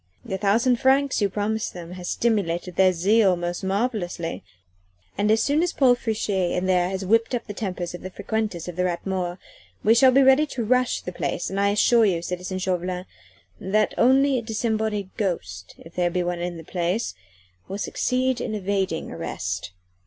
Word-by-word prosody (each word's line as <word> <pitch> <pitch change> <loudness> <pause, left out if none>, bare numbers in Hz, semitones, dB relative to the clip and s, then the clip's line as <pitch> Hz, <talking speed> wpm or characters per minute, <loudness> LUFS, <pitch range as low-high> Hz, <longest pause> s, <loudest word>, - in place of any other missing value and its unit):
The 190 - -3
thousand 230 +5 +3
francs 270 0 +2
you 200 - +2
promised 210 +2 -2
them 175 -1 -8
has 180 -1 -6
stimulated 180 -6 0
their 190 -1 +5
zeal 195 +2 +3
most 175 +1 -4
marvellously, 190 - -2 0.7
and 210 - +1
as 220 +1 +4
soon 290 +3 +2
as 350 0 0
Paul 260 -3 +5
Friche 225 -3 -3 0.3
in 180 +1 -1
there 180 -1 +2
has 190 0 -3
whipped 225 +5 +2
up 235 - -4
the 205 - -6
tempers 185 -4 -4
of 175 - -8
the 185 - -6
frequenters 210 -3 -3
of 180 -1 -7
the 180 - +1
Rat 175 -1 -2
Mort, 185 -2 -2 0.5
we 220 - +5
shall 255 +3 +6
be 270 +2 +5
ready 265 +3 +5
to 245 -5 -4
rush 255 +2 +2
the 180 - -6
place 180 - -3
and 195 - -2
I 200 0 +3
assure 225 +3 +4
you, 175 -4 0
citizen 180 +1 -4
Chauvelin, 180 -1 -2 0.5
that 210 +3 +1
only 265 +1 +4
a - - -5
disembodied 220 -3 -2
ghost 95 - -3
if 165 - -14
there 175 -1 +1
be 180 +1 -1
one 175 0 -2
in 175 0 -4
the 165 - -9
place 175 - -2 0.5
will 195 - -5
succeed 255 +3 0
in 215 - -3
evading 190 -4 -2
arrest." 90 +3 -4
195 Hz, 190 wpm, -24 LUFS, 180-230 Hz, 0.7 s, shall